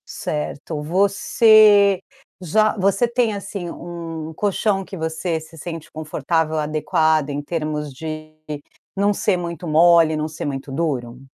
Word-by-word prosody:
Certo, 150 +1 -4
você 200 +3 +5 0.4
já 215 +5 +2
você 195 +4 +2
tem 235 -2 +1
assim 195 -3 -5
um 165 -2 -7
colchão 200 +2 0
que 190 - -9
você 160 +1 -2
se 160 +1 -14
sente 165 +1 -7
confortável, 155 +1 -1
adequado 155 0 +1
em 145 0 -3
termos 150 -2 -3
de 155 +2 -7 0.6
não 200 +1 +2
ser 200 -1 +1
muito 170 -1 -5
mole, 165 0 +5
não 155 0 -2
ser 155 0 -6
muito 135 -1 -4
duro? 130 -5 -2
165 Hz, 130 wpm, -21 LUFS, 155-195 Hz, 0.6 s, você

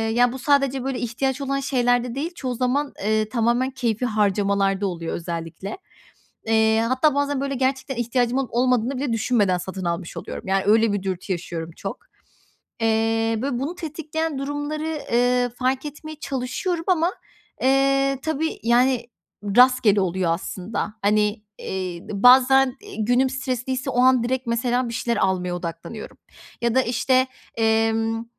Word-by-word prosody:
ya, 245 0 +4
bu 265 - -6
sadece, 275 -1 +2
böyle, 265 -1 -2
ihtiyaç 260 +3 -2
olan 275 0 -1
şeylerde 245 -3 +1
değil, 310 +5 -3
çoğu 255 -5 -3
zaman, 270 +4 0
eee, 215 +1 +1
tamamen 240 +3 +1
keyfî 250 -3 -1
harcamalarda 200 -2 +1
oluyor 170 -3 -4
özellikle. 170 +3 -5 0.7
Eee, 220 0 +3
hatta 260 +4 +2
bazen, 285 -1 0
böyle, 275 0 -2
gerçekten 265 0 -1
ihtiyacım 240 +1 0
olup 265 -4 -2
olmadığını 250 +1 +1
bile 260 -1 -2
düşünmeden 210 -5 +2
satın 190 +1 -6
almış 170 0 -3
oluyorum. - - -7
Yani, 190 0 +1
öyle 220 +1 +4
bir 205 -2 -2
dürtü 190 0 -3
yaşıyorum 170 -2 -5
çok. - - -5 0.8
Eee, 225 0 +1
böyle, 270 -2 -1
bunu 285 +7 -3
tetikleyen 320 -2 -4
durumları, 290 +2 -3 0.3
eee, 245 +1 +3
fark 260 +3 0
etmeye 310 +1 -8
çalışıyorum 310 +7 -3
ama, 350 -1 +2 0.5
eee, 275 +1 +3
tabii, 315 0 -2
yani, 240 +1 +2 0.5
rastgele 250 -5 +5
oluyor 185 -2 0
aslında. 190 +4 -4
Hani, 210 +1 +2 0.2
eee, 185 -2 -4
bazen, 255 +4 +5
eee, - - -10
günüm 245 +4 +2
stresliyse 260 0 -3
o 245 - +1
an 255 -1 +5
direkt 260 +1 -1
mesela 245 +1 0
bir 230 - -5
şeyler 235 0 -1
almaya 180 -1 0
odaklanıyorum 170 +5 -7 0.4
ya 235 -1 +1
da, 260 - +4
işte, 255 +2 +2 0.3
emm, 225 0 +1
245 Hz, 145 wpm, -23 LUFS, 215-270 Hz, 0.8 s, rastgele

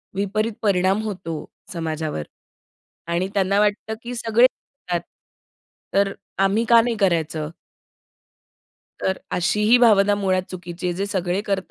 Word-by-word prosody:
विपरीत 210 +3 0
परिणाम 195 0 +2
होतो 185 -6 -4 0.4
समाजावर. 155 - -3 0.8
आणि 170 +2 0
त्यांना 200 0 +2
वाटतं 210 +1 +1
की 245 +1 -5
सगळे 235 +1 +4
करतात, 180 -9 -6 0.9
तर 200 0 +3
अ, 195 - -5
आम्ही 205 +4 +2
का 235 -1 +8
नाही 235 0 -1
करायचं? 160 -5 0 1.5
तर 190 - -1
अशी 180 +4 +1
ही 245 - +9
भावना 205 -4 +5
मुळात 190 -2 +1
चुकीची 180 -1 -6
आहे. 175 - 0
जे 200 +2 -1
सगळे 185 -1 -1
करतात 195 -3 -2
195 Hz, 135 wpm, -22 LUFS, 180-210 Hz, 1.5 s, ही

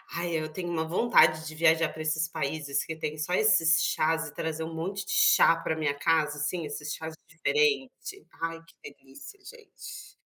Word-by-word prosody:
ai 170 0 -3
eu 155 0 -5
tenho 175 +2 -6
uma 160 -1 -1
vontade 160 -4 +3
de 155 - -7
viajar 165 0 +3
para 160 - -9
esses 160 +1 0
países 145 -2 -3
que 160 - -6
têm 155 -1 -4
só 160 +4 -2
esses 170 -6 +4
chás 160 0 0
e 150 - -11
trazer 160 +1 -4
um 165 0 -6
monte 190 +5 -4
de - - -6
chá 440 - +5
para 160 - -3
minha 155 -2 -1
casa, 150 0 0
assim, 160 +3 -2
esses 150 0 -6
chás 160 0 -7
diferente, 395 - -1 0.2
ai 165 0 -3
que 145 - -14
delícia, 135 - -13
gente. 475 -3 -12
160 Hz, 185 wpm, -27 LUFS, 155-175 Hz, 0.2 s, chá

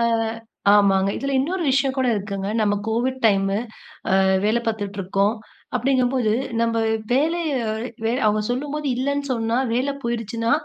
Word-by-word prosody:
அ - - +2 0.7
ஆமாங்க. 195 -1 +4
இதுல 275 0 -2
இன்னொரு 350 +6 -1
விஷயம் 270 0 +2
கூட 260 - +2
இருக்குங்க. 200 -1 -3
நம்ம 205 -1 +2
கோவிட் 250 +4 -1
டைமு. 195 -1 +2 0.6
அ, - - +4 0.2
வேல 220 +3 +3
பார்த்துட்ருக்கோம். 200 -1 -1 0.4
அப்படீங்கும்போது 255 -2 +1 0.3
நம்ப 230 0 +1 0.3
வேலைய 320 +4 +1 0.5
வே 225 - +1
அவங்க 215 0 +2
சொல்லும்போது 290 +4 -3
இல்லன்னு 280 +2 -1
சொன்னா, 230 -1 0 0.2
வேலை 260 +4 0
போயுருச்சுன்னா, 230 -1 -2
230 Hz, 130 wpm, -22 LUFS, 205-265 Hz, 0.7 s, ஆமாங்க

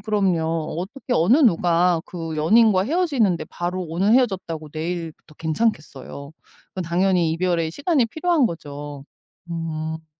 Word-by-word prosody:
그럼요. 200 -4 +1 0.4
어떻게 235 +8 -5
어느 180 +11 +4
누가 175 - +3
그 165 -3 -6
연인과 195 +4 +4
헤어지는데 255 - +1
바로 180 +2 -3
오늘 180 +6 0
헤어졌다고 185 -10 0
내일부터 160 -1 -5
괜찮겠어요. 155 - -3 0.4
그건 185 - -5
당연히 175 0 +2
이별의 165 -1 0
시간이 280 - +1
필요한 315 +1 +1
거죠. 145 -5 -7 0.5
음. 160 -1 -4
175 Hz, 320 characters per minute, -22 LUFS, 160-215 Hz, 0.5 s, 어느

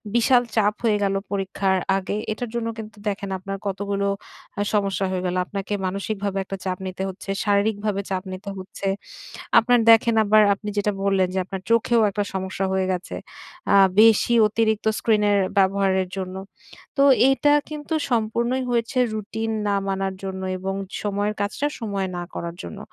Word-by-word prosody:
বিশাল 245 +1 +4
চাপ 210 -1 +3
হয়ে 215 -2 +3
গেল 195 0 +1 0.2
পরীক্ষার 195 -1 0 0.2
আগে। 195 +1 -3 0.2
এটার 235 +1 -4
জন্য 230 -1 -1
কিন্তু 220 0 -8
দেখেন 200 -1 -2
আপনার 195 +1 -5
কতগুলো 200 +1 -1 0.5
আ - - +2
সমস্যা 200 -1 +1
হয়ে 185 0 -2
গেল। 180 0 -1
আপনাকে 200 +1 -4
মানসিকভাবে 200 +1 -3
একটা 195 0 -6
চাপ 185 -1 -1
নিতে 185 +1 -4
হচ্ছে, 190 +1 -10 0.2
শারীরিকভাবে 205 0 +1
চাপ 185 0 -2
নিতে 200 +2 -7
হচ্ছে। 190 +1 -6 0.7
আপনার 245 +1 +3
দেখেন 225 0 +5
আবার 215 +1 +5
আপনি 210 +1 -6
যেটা 205 +1 +1
বললেন 195 -2 +2
যে, 190 - 0
আপনার 190 -1 -6
চোখেও 230 0 +3
একটা 205 +1 -1
সমস্যা 190 0 -2
হয়ে 190 0 +1
গেছে। 180 0 -4 0.6
আ - - +7 0.3
বেশি 225 +1 +5
অতিরিক্ত 220 0 0
স্ক্রিনের 210 -2 +3 0.2
ব্যবহারের 190 -1 +2
জন্য। 185 0 -4 0.6
তো, 275 - +5 0.3
এইটা 290 +2 +3 0.2
কিন্তু 300 +1 -5 0.2
সম্পূর্ণই 235 +3 0
হয়েছে 235 +2 -1 0.2
রুটিন 225 +1 -3 0.2
না 200 - +2
মানার 195 0 -1
জন্য 190 0 -5 0.2
এবং 195 +1 -3 0.3
সময়ের 205 +1 -1
কাজটা 215 +8 -1
সময়ে 200 -4 -2
না 175 - -3
করার 170 0 -5
জন্য। 85 - -8
200 Hz, 160 wpm, -23 LUFS, 190-220 Hz, 0.7 s, আ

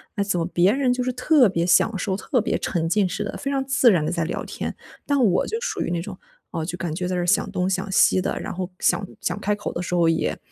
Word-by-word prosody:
那 200 - 0
怎 195 -3 -1
么 165 - 0
别 180 +2 +3
人 260 +1 +1
就 250 0 -1
是 255 - -1
特 255 -1 +4
别 170 -2 0
享 210 +4 +3
受、 190 +1 -1
特 245 +5 -1
别 - - -1
沉 165 -2 -1
浸 200 +3 +2
式 180 - -3
地、 - - -5
非 275 - -4
常 270 -1 0
自 265 -3 +4
然 165 -6 +2
地 - - -1
在 170 -2 -1
聊 160 - -3
天， - - -5 0.3
但 285 -1 +1
我 190 -5 +3
就 450 - -2
属 435 -5 -3
于 - - -1
那 170 -1 -1
种， - - -8 0.3
哦， 160 - -3
就 175 +1 -5
感 170 -4 -3
觉 180 +2 -3
在 185 - -2
这 180 - 0
儿 - - -1
想 195 +3 +2
东 185 -1 -1
想 190 +1 -2
西 185 -1 +4
的， - - -2
然 - - -5
后 185 0 -4
想 200 - +1
想 - - -2
开 210 0 0
口 205 - -5
的 170 - -3
时 180 - -4
候 170 -1 +3
也 165 0 0
190 Hz, 310 characters per minute, -23 LUFS, 175-240 Hz, 0.3 s, 特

